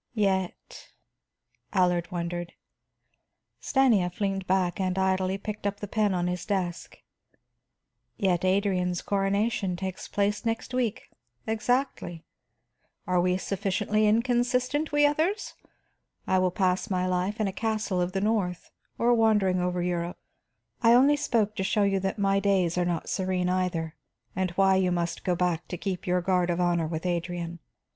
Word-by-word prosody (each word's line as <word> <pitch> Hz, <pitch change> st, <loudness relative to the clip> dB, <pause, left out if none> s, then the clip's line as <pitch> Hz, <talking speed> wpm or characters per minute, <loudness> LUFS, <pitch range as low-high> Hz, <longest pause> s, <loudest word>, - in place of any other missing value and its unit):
"Yet?" 190 Hz, -4 st, -2 dB, 0.8 s
Allard 180 Hz, -3 st, +2 dB
wondered. 175 Hz, 0 st, -4 dB, 1.1 s
Stanief 220 Hz, -11 st, +2 dB
leaned 195 Hz, -2 st, -1 dB
back 185 Hz, -1 st, +1 dB
and 185 Hz, -1 st, -1 dB
idly 190 Hz, 0 st, +1 dB
picked 210 Hz, 0 st, -4 dB
up 200 Hz, 0 st, -3 dB
the 205 Hz, -, -5 dB
pen 205 Hz, -2 st, +1 dB
on 175 Hz, -1 st, 0 dB
his 180 Hz, -1 st, -2 dB
desk. 180 Hz, -4 st, -3 dB, 1.2 s
"Yet 185 Hz, -4 st, +1 dB
Adrian's 185 Hz, -2 st, +1 dB
coronation 200 Hz, 0 st, 0 dB
takes 190 Hz, 0 st, -5 dB
place 205 Hz, +1 st, 0 dB
next 230 Hz, +2 st, -3 dB
week, 240 Hz, -4 st, -2 dB, 0.3 s
exactly. 225 Hz, -, -1 dB, 0.8 s
Are 180 Hz, -2 st, +2 dB
we 180 Hz, +1 st, +2 dB
sufficiently 205 Hz, +2 st, 0 dB
inconsistent, 250 Hz, +6 st, +1 dB
we 295 Hz, 0 st, +4 dB
others? 320 Hz, +8 st, 0 dB, 0.7 s
And -, -, -1 dB
I 185 Hz, -, +5 dB
will 185 Hz, 0 st, +2 dB
pass 185 Hz, +2 st, 0 dB
my 185 Hz, -2 st, 0 dB
life 185 Hz, +4 st, -1 dB
in 215 Hz, -, +1 dB
a 195 Hz, -, -3 dB
castle 215 Hz, -3 st, -1 dB
of 180 Hz, +1 st, -2 dB
the 195 Hz, -, -1 dB
north, 205 Hz, -5 st, -1 dB, 0.3 s
or 240 Hz, +1 st, +3 dB
wandering 210 Hz, -5 st, +3 dB
over 180 Hz, 0 st, -1 dB
Europe. 175 Hz, -1 st, -2 dB, 0.6 s
I 235 Hz, 0 st, +6 dB
only 275 Hz, +4 st, +5 dB
spoke 230 Hz, -8 st, 0 dB
to 190 Hz, -, 0 dB
show 210 Hz, +1 st, +1 dB
you 195 Hz, -1 st, +2 dB
that 190 Hz, +2 st, -2 dB
my 195 Hz, -1 st, +2 dB
days 195 Hz, -4 st, +1 dB
are 180 Hz, -1 st, +1 dB
not 175 Hz, -2 st, -2 dB
serene 185 Hz, -1 st, -1 dB
either, 180 Hz, -3 st, -1 dB, 0.4 s
and 185 Hz, 0 st, 0 dB
why 190 Hz, 0 st, +4 dB
you 185 Hz, -1 st, +2 dB
must 170 Hz, -1 st, -2 dB
go 180 Hz, -, +1 dB
back 175 Hz, -1 st, -1 dB
to 180 Hz, -, -5 dB
keep 185 Hz, 0 st, -4 dB
your 180 Hz, 0 st, +2 dB
guard 180 Hz, -1 st, +1 dB
of 175 Hz, 0 st, 0 dB
honor 175 Hz, -2 st, +1 dB
with 160 Hz, +1 st, -4 dB
Adrian. 170 Hz, -1 st, -3 dB
190 Hz, 155 wpm, -27 LUFS, 180-210 Hz, 1.2 s, I